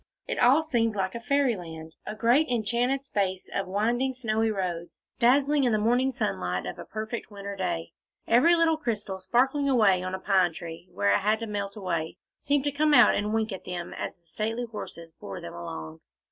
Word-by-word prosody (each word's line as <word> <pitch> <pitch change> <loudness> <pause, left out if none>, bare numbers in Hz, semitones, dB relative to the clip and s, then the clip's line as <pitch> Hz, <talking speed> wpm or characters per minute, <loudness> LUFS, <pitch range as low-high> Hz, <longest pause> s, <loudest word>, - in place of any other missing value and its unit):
It - - -2
all 275 +6 +5
seemed 230 -7 +1
like 190 -1 -1
Fairyland, 180 - -1
a 210 - -4
great 240 +8 +3
enchanted 245 +4 0
space 190 -6 -1
of 195 -1 -1
winding 240 +7 0
snowy 225 -2 0
roads, 180 -5 -4 0.2
dazzling 275 +4 +4
in 245 - +3
the - - +3
morning 245 +5 +2
sunlight 95 - -2
of 90 - -6
a - - -7
perfect 220 +2 -5
winter 200 -1 -7
day; 175 -3 -3 0.4
every 265 +10 +5
little 330 -1 +3
crystal 210 -9 -3
sparkling 265 +8 +2
away 210 -8 +4
on 185 0 -3
a - - -6
pine 185 -3 +2
tree, 165 +2 -8
where 100 0 +2
it - - +3
had 215 +2 +1
to - - -2
melt 200 -2 -4
away, 175 -4 -3 0.2
seemed 285 -1 +1
to 290 - 0
come 300 +1 +3
out - - +7
and 210 +1 -1
wink 220 0 0
at 190 - -7
them, 175 -1 -5
as - - -5
the 170 - -32
stately 225 +8 -2
horses 170 -6 -7
bore 100 - -8
them 85 - -8
along. 80 -2 -7
215 Hz, 195 wpm, -27 LUFS, 180-245 Hz, 0.4 s, out